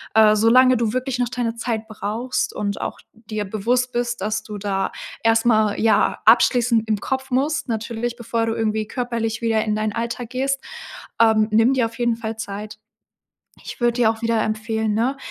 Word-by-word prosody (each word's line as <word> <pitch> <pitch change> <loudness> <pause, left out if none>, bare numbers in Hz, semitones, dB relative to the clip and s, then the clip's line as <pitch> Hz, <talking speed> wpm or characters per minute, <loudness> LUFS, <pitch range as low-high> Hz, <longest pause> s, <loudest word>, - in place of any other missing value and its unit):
äh, 215 -1 +6
solange 255 +3 +5
du 230 -1 0
wirklich 255 0 -2
noch 245 - +1
deine 235 -2 -2
Zeit 225 -2 -3
brauchst 220 +4 -3
und 205 -1 -2
auch - - -5
dir 215 -2 -5
bewusst 240 +5 0
bist, 240 -3 -2
dass 215 +2 -2
du 210 -1 -7
da 195 -1 -2 0.3
erst 225 0 +3
mal, 215 -3 +3
ja, 220 -1 +2
abschließen 230 0 +4
im 215 -1 0
Kopf 265 0 -3
musst, 280 +3 0
natürlich 230 +1 -3
bevor 230 -1 -2
du 225 - -1
irgendwie 215 -1 -1
körperlich 235 -2 -3
wieder 225 -1 +1
in 210 -1 0
dein 215 0 -1
Alltag 235 0 -4
gehst. 270 +1 -1 0.6
Ähm, 220 -1 +4
nimm 225 +4 +4
dir 250 -3 +2
auf 230 +2 -7
jeden 240 -1 +1
Fall 225 -1 -5
Zeit. 215 0 -7 0.9
Ich - - -8
würde 240 0 +3
dir 235 -3 +3
auch 225 +1 -6
wieder 230 -1 +1
empfehlen, 220 0 -1
ne, 250 +5 0
225 Hz, 185 wpm, -21 LUFS, 215-240 Hz, 0.9 s, äh